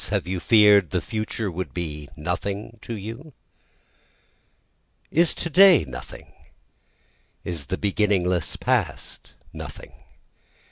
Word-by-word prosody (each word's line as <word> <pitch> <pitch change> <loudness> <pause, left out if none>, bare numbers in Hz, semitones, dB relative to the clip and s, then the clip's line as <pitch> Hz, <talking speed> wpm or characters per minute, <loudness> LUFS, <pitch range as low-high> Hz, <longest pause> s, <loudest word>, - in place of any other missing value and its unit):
Have - - 0
you 90 0 -3
fear'd 105 -1 +5
the 90 - 0
future 110 0 -3
would 90 +2 -5
be 75 -4 -5
nothing 100 +7 -4
to 115 - -6
you? 115 +9 -8 1.8
Is 165 +1 +3
to - - -3
day 185 - +7
nothing? 65 -2 -10 1.1
is 80 -6 -4
the 95 - -2
beginningless 95 -4 0
past - - -2 0.2
nothing? - - -8
100 Hz, 105 wpm, -24 LUFS, 90-110 Hz, 1.8 s, day